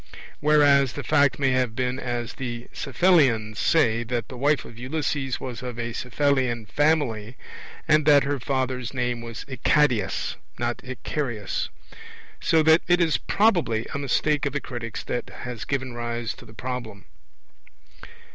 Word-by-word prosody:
Whereas 145 -4 +4
the - - -5
fact 145 -3 +3
may 135 -2 +2
have 125 -3 0
been 125 +1 -1
as 120 -2 -3
the 120 -2 -5
Cephallenians 130 - +2
say, 115 -8 +3
that 120 -1 -3
the 130 - -8
wife 145 +2 +1
of 115 - -12
Ulysses 135 0 -2
was 125 -3 -6
of 125 -2 -6
a 120 -1 -3
Cephallenian 125 -2 0
family, 130 -4 0 0.5
and 155 -1 +4
that 145 -2 +7
her 140 0 -1
father's 130 -1 -2
name 120 -2 -1
was 115 -1 -7
Icadius, 125 -5 +1 0.2
not 120 0 -2
Icarius. 125 -4 -3 0.7
So 160 -1 +3
that 160 +1 +6
it 175 0 +4
is 165 -3 +2
probably 175 - +2
a 140 - -2
mistake 145 +2 +1
of 140 - -4
the 145 - 0
critics 120 -4 -6
that 120 - -3
has 125 -2 -6
given 130 -2 -2
rise 120 -1 -3
to - - -14
the 110 - -15
Problem. 120 -5 -6
130 Hz, 150 wpm, -25 LUFS, 120-145 Hz, 0.7 s, that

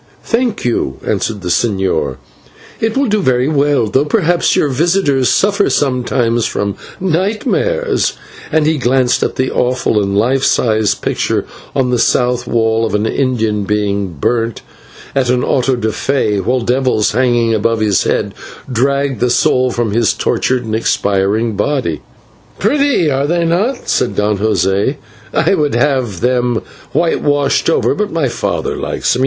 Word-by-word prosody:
"Thank 235 - -1
you," 115 - -1
answered 105 -3 -2
the 90 - -4
señor, 95 0 0 0.6
"it 225 +2 -1
will 275 - +2
do 215 -3 +1
very 130 -4 +1
well, 145 -4 +2
though 130 +6 +1
perhaps 175 0 +1
your - - +2
visitors 145 -2 +1
suffer 200 0 +2
sometimes 125 -3 0
from 100 -1 -2 0.3
nightmare," 215 - 0 0.6
and 160 -1 +2
he 155 -1 +1
glanced 130 0 +2
at - - -1
the 130 0 -1
awful 125 -3 +1
and 100 0 -1
life 130 +5 +1
sized 110 -5 +1
picture - - -1 0.3
on 130 -3 +1
the 125 - +1
south 125 0 +1
wall 110 -1 +1
of 110 -2 -1
an 105 +1 0
Indian 110 -4 0
being 100 -2 -1
burnt 115 - -1 0.5
at 130 -3 0
an 125 0 +1
/auto 130 -1 +1
da 110 -1 0
fé/, 110 -5 0
while 125 +5 0
devils 125 -3 +1
hanging 120 -1 +2
above 115 +1 +1
his 105 -2 +2
head - - -1 0.4
dragged 135 +1 0
the 125 - +1
soul 130 +1 +2
from 120 -3 -1
his 115 0 +2
tortured 130 -2 -1
and 110 - -4
expiring 105 0 0
body. 115 - -1 0.6
"Pretty, 270 - +2
are 135 +1 0
they 170 +1 +1
not?" 205 +11 -1
said 100 - 0
Don 105 0 0
José; 100 - +1 0.4
"I - - +2
would 150 -8 0
have 125 - 0
them 125 -2 +1 0.3
whitewashed 145 -3 +1
over, - - +2
but 210 0 -2
my 160 -4 0
father 120 - -2
likes - - -1
them. 125 - -1
125 Hz, 155 wpm, -15 LUFS, 110-145 Hz, 0.6 s, will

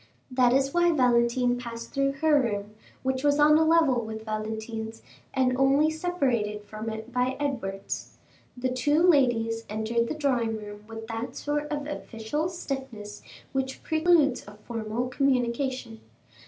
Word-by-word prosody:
That 250 -1 +4
is 270 +1 +2
why 345 0 +4
Valentine 245 -2 +3
passed 230 -1 -7
through 275 0 +1
her 300 -3 +5
room, 210 -3 -3 0.3
which 260 0 -1
was 290 0 +3
on 300 +1 +7
a - - +5
level 315 -7 +4
with 220 0 -6
Valentine's, 220 +1 -4 0.3
and 255 -1 +2
only 275 +4 +4
separated 260 -11 -1
from 215 +2 -6
it 220 +2 -7
by 250 +1 0
Edward's. 205 -9 -4 0.4
The 255 +1 -1
two 290 +6 +2
ladies 230 -7 +3
entered 220 +2 0
the - - -3
drawing 245 -7 0
room 210 0 -9
with 225 0 -7
that 230 +2 -5
sort 295 0 -2
of 290 -1 -3
official 295 +2 -3
stiffness 265 -11 -6 0.3
which 265 0 -3
preludes 315 -4 +3
a 205 - -11
formal 230 +1 -3
communication. 255 -2 0
250 Hz, 145 wpm, -27 LUFS, 225-280 Hz, 0.4 s, on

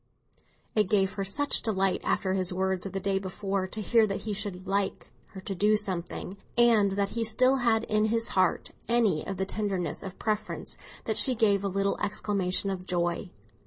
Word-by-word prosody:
It 210 -3 +2
gave 195 -2 +2
her 195 - -3
such 285 +10 +2
delight, 195 -3 0
after 190 -1 0
his 185 -1 0
words 190 0 -1
of - - -8
the 195 - -2
day 195 0 0
before, 195 0 -3
to 215 +3 -4
hear 225 0 +4
that 195 - -3
he 215 - -3
should 195 -3 -4
"like" 195 0 -2 0.2
her 190 - -11
to 195 - -4
do 210 +3 +3
something, 190 -1 -3 0.2
and 225 -5 +5
that 200 0 0
he 230 +2 -2
still 255 +4 +3
had 230 -3 +2
in 215 -1 +1
his 230 +1 +1
heart 185 -2 +1 0.2
any 220 -10 +2
of 195 - -4
the 190 - -1
tenderness 195 -3 -2
of 190 -1 -8
preference, 215 -1 -3 0.3
that - - -1
she 260 -2 +6
gave 205 -4 +2
a - - 0
little 195 +1 -1
exclamation 200 -2 0
of 185 -1 -6
joy. 175 +1 -1
200 Hz, 195 wpm, -28 LUFS, 190-215 Hz, 0.3 s, she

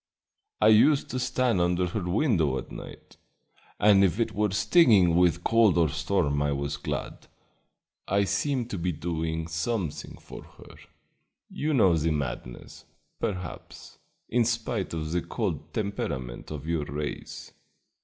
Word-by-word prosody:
I 110 - +5
used 135 +7 +5
to 130 - -2
stand 125 -5 +1
under 90 +1 +1
her 95 +4 -3
window 90 - +1
at 65 - -7
night, - - -11 0.6
and 100 -2 +6
if 95 +2 +1
it 115 - 0
were 105 0 +1
stinging 100 - +4
with 85 -1 +3
cold 115 -5 +4
or 80 -3 +3
storm 80 -3 0
I 75 0 +1
was 70 +1 -3
glad. 70 - -5 0.8
I 100 +1 +2
seemed 120 +5 -1
to 100 - -3
be 90 +2 -1
doing 80 0 -3
something 85 0 -3
for - - -11
her; - - -16 0.8
you 150 0 -1
know 95 -9 +5
the 80 +1 0
madness, 65 -5 -5 0.3
perhaps, 90 -3 -6 0.3
in 120 0 +2
spite 115 -5 -2
of 80 -1 -4
the 90 +1 0
cold - - -4
temperament 75 - -4
of 75 -2 -7
your 80 -2 -1
race. 75 +1 -6
90 Hz, 145 wpm, -27 LUFS, 80-110 Hz, 0.8 s, and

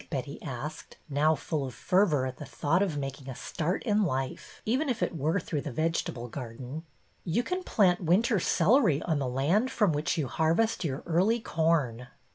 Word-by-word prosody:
" - - -31
Betty 140 -1 -4
asked, 145 +3 -6
now 150 +3 +3
full 150 0 -3
of 130 -4 -6
fervor 180 -8 +2
at 130 -1 -5
the - - -7
thought 165 +6 0
of 180 -7 0
making 135 -1 -5
a 130 - -5
start 170 +7 -2
in 215 -3 +2
life, 135 -6 -3
even 265 +7 +1
if 235 -3 0
it - - -1
were 160 +6 +1
through 150 -3 -3
the 145 - -5
vegetable 130 -4 -1
garden. 125 +4 -7 0.4
You 185 +9 0
can 365 +7 -2
plant 190 - +3
winter 195 +6 +3
celery 180 - +3
on 160 -4 0
the 135 -2 -1
land 165 - +2
from 210 -8 +2
which 150 +4 -1
you 150 -4 0
harvest 165 - +1
your 140 -3 -3
early 190 +8 +2
corn." 155 - 0
160 Hz, 190 wpm, -29 LUFS, 135-195 Hz, 0.4 s, now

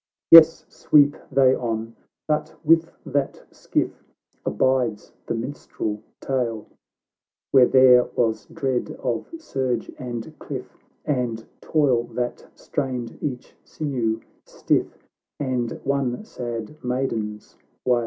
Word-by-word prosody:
Yes, 165 -1 +9
sweep 145 -1 +4 0.2
they 130 -1 +5
on 115 -1 -3 0.2
!— - - -66
But 150 -1 -1
with 165 +1 +4 0.2
that 140 0 -2
skiff - - -2 0.4
Abides 125 -5 0
the - - -1
minstrel 115 -4 -4 0.2
tale, 120 -5 -2 0.9
Where 130 -2 +7
there 125 -2 +6
was 115 -2 0
dread 130 -3 -2
of 120 -3 -2
surge 130 - -2
and 120 -3 -6
cliff, - - -7 0.3
And 120 -5 -1 0.2
toil 135 -7 +2
that 125 -1 -3
strained 130 -5 -3
each 125 -4 -5
siuew 120 -7 -2 0.2
stiff, - - 0 0.4
And 125 -4 -2
one 140 - -1
sad 120 - -6
Maiden's 115 -4 -3 0.3
wail. 125 -1 +4
125 Hz, 110 wpm, -23 LUFS, 115-140 Hz, 0.9 s, Yes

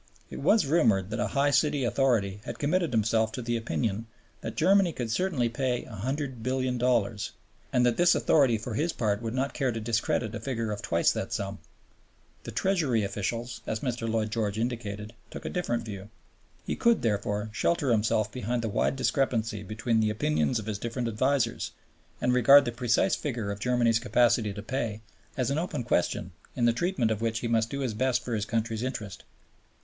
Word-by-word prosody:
It - - -6
was 215 -4 +4
rumored 110 - +2
that 110 - -2
a - - +1
high 145 +1 +4
city 145 -1 +2
authority 115 -6 +1
had - - -6
committed 170 +3 +1
himself 110 -1 +2
to 125 - -4
the 120 0 -1
opinion 115 -1 -2 0.3
that - - -5
Germany 190 -3 +4
could 120 -5 -3
certainly 150 -4 +1
pay 125 +1 -1
$100,000,000,000 125 -2 -1 0.4
and 125 -1 +3
that 120 -1 +2
this 175 0 +5
authority 135 -7 +3
for 115 +2 -6
his 160 +9 0
part 105 -2 0
would 115 +1 -3
not 135 +2 -1
care 135 -4 0
to 115 - -4
discredit 115 0 0
a - - -4
figure 115 -5 -3
of 105 - -4
twice 85 0 +2
that - - -4
sum. - - -3 0.9
The - - -5
Treasury 155 - +1
officials, 115 +4 -3
as 110 - -2
Mr. 120 -3 -2
Lloyd 110 -1 0
George 110 -2 -1
indicated, 110 -3 -3 0.2
took - - -9
a - - -2
different 120 -10 -2
view. 100 -2 -7 0.6
He - - -2
could, 235 -1 +3
therefore, 105 -1 -1
shelter 145 +3 +1
himself 110 -1 +2
behind 120 0 -2
the 110 - -1
wide 105 - +1
discrepancy 115 -5 0
between 110 +3 -1
the 110 -1 +2
opinions 80 -4 +1
of 110 - -4
his 105 -2 -3
different 120 +1 -2
advisers, 120 +1 0 0.5
and 125 0 +1
regard 135 +3 +7
the 120 - -1
precise 120 0 +2
figure 120 -8 -3
of 100 - -5
Germany's 120 -1 +2
capacity 115 -1 +2
to 100 +1 -7
pay 115 -3 -3 0.4
as 130 0 0
an 145 - +1
open 165 -7 -3
question 90 -4 0 0.2
in 120 - +1
the 120 - +4
treatment 125 -4 0
of 110 0 -2
which 115 0 -1
he 120 - -2
must 115 -1 +1
do 140 +2 -4
his 125 -5 -1
best 125 +2 0
for 120 - -3
his 105 -2 -1
country's 115 -1 -1
interests. 110 -7 -5
115 Hz, 190 wpm, -28 LUFS, 110-130 Hz, 0.9 s, regard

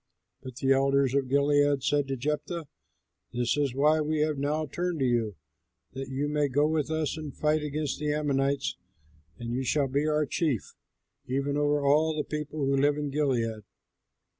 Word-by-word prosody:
But 130 -2 -9
the 135 0 0
elders 135 -1 +3
of 135 -2 0
Gilead 145 0 +3
said 145 -1 +1
to 135 -1 -2
Jephthah, 150 +4 -3 0.7
"This 120 0 +1
is 140 -4 0
why 150 +3 +4
we 155 0 0
have 155 -2 0
now 150 +3 0
turned 175 +4 -2
to 135 - +1
you, 115 -5 0 0.6
that 135 0 -6
you 135 +2 -1
may 150 -1 +1
go 145 +2 +2
with 155 -1 0
us 160 -1 -1
and 150 -3 -7
fight 155 0 +2
against 150 -1 -3
the 150 0 0
Ammonites, 140 -2 0 0.6
and 120 0 -5
you 130 +2 -1
shall 140 +2 +1
be 140 +3 0
our 150 0 +2
chief, 145 - -1 0.5
even 140 +2 -1
over 145 0 +1
all 155 +2 +3
the 150 - 0
people 150 -1 -3
who 135 0 +2
live 145 +2 +3
in 145 -1 -3
Gilead." 120 -7 0
145 Hz, 180 wpm, -28 LUFS, 135-150 Hz, 0.7 s, why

